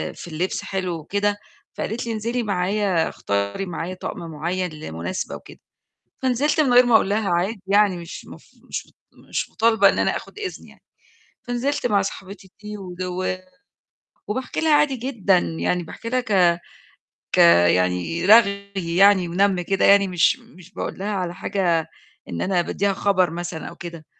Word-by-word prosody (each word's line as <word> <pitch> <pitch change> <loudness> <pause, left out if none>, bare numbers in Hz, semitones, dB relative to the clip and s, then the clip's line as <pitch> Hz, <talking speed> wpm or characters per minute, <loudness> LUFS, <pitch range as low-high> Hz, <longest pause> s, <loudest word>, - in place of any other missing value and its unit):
في - - -9
اللبس 170 +3 -3
حلو 185 -2 -3
وكده، 205 +6 -1 0.4
فقالت 230 +4 -4
لي 235 - -3
انزلي 235 +3 -2
معايا 195 -3 0
اختاري 100 - -2
معايا 175 0 -5
طقم 185 - -6
مُعيّن 170 +3 -3
لمُناسبة 85 - -5
وكده، - - -13 0.6
فنزلت 265 +5 +1
من 265 -5 +2
غير 245 0 +7
ما 240 - +4
أقول 210 - +4
لها 205 0 0
عادي 185 +5 0
يعني 200 -2 +3
مش 170 -1 -9
مف - - -14 0.2
مش - - -6 0.3
مش - - -2
مطالبة 225 0 +4
إن - - -1
أنا - - +1
آخُد - - -12
إذن 390 -4 -6
يعني، - - -19 0.6
فنزلت 245 +3 -1
مع 205 -4 +2
صاحبتي 190 0 -8
دي، 210 0 -7
و 185 -1 -4 0.9
وباحكي 250 +5 -3
لها 315 -2 +3
عادي 290 -2 +3
جدًا، 225 -7 +1
يعني 175 +1 -1
باحكي 200 +7 -8
لها 255 +1 +2
ك 180 -7 +3 0.7
ك - - 0 0.3
يعني 90 - 0
رغي 200 -2 +5 0.3
يعني 195 -2 +6
ونم 190 +1 +2
كده 195 +2 +1
يعني، 200 0 +6
مش 180 +8 +3
مش 195 -7 -17
باقول - - -5
لها 200 +2 -2
على 180 -3 -3
حاجة 180 -4 0 0.4
إن 85 - -4
أنا 185 -2 +1
باديها 200 +3 -1
خبر 185 -3 +2
مثلًا 170 -1 -5
أو - - -12
كده، 170 -2 -9
195 Hz, 160 wpm, -22 LUFS, 175-215 Hz, 0.9 s, غير